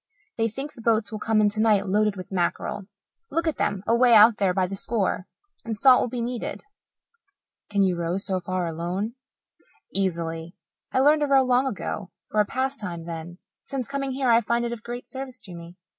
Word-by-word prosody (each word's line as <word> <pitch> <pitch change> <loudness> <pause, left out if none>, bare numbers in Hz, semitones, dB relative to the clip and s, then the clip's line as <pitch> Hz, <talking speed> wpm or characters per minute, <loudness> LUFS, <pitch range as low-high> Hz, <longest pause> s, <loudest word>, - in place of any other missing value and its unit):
They 225 0 +1
think 270 +7 -6
the 235 - -12
boats 225 -1 +1
will 215 - -4
come 220 0 +2
in 210 - +4
tonight 215 -1 +2
loaded 210 +1 +2
with 185 0 -9
mackerel 190 +2 -2 0.4
look 330 0 -1
at 320 - 0
them 195 -1 -1
away 235 +1 +5
out 215 +1 +8
there 195 -2 +2
by 185 0 +1
the 190 +2 -5
score 195 -2 -1 0.4
and 225 -2 -4
salt 260 +2 +6
will - - -1
be 240 -1 -3
needed." 240 0 -4 1.1
"Can 200 -1 +2
you 185 -2 +2
row 170 +1 -1
so 195 -1 -1
far 185 0 -2
alone?" 175 +7 -3 0.8
"Easily. 170 -3 -2 0.4
I 260 - +2
learned 300 +2 +5
to 295 - +2
row 270 -1 +5
long 255 +1 +2
ago 200 -5 -4 0.2
for 215 - +1
a 210 - +5
pastime 230 -11 -3
then. 170 +1 -7 0.3
Since 265 -3 -4
coming 275 -1 -2
here 260 -2 +1
I 230 0 +6
find 235 +2 0
it 235 - -2
of 235 -2 -6
great 240 +2 -7
service 260 -1 -5
to 185 - -9
me." 170 +1 -10
215 Hz, 200 wpm, -25 LUFS, 185-245 Hz, 1.1 s, out